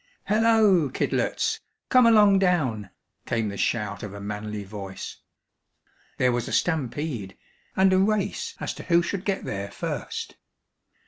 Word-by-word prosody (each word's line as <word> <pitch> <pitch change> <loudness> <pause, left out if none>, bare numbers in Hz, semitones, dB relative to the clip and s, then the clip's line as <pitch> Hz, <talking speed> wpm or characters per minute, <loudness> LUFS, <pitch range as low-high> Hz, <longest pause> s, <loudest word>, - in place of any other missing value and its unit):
"Halloa, 210 -7 +4
Kidlets! - - 0 0.3
Come 255 -2 +6
along 210 -3 +6
down!" 135 - +1 0.4
came 115 -3 0
the 100 - -6
shout 105 -1 -1
of 100 -1 -7
a - - -7
manly 105 +1 -5
voice. 100 -1 -7 1.0
There 125 0 +3
was 120 -1 -1
a - - -5
stampede, 140 - -1 0.4
and 190 0 +4
a 185 - +4
race 210 - 0
as - - -3
to - - -9
who 170 -1 +4
should 190 +1 -3
get 195 -1 -1
there 100 0 -4
first. - - -5
145 Hz, 140 wpm, -25 LUFS, -, 1.0 s, Come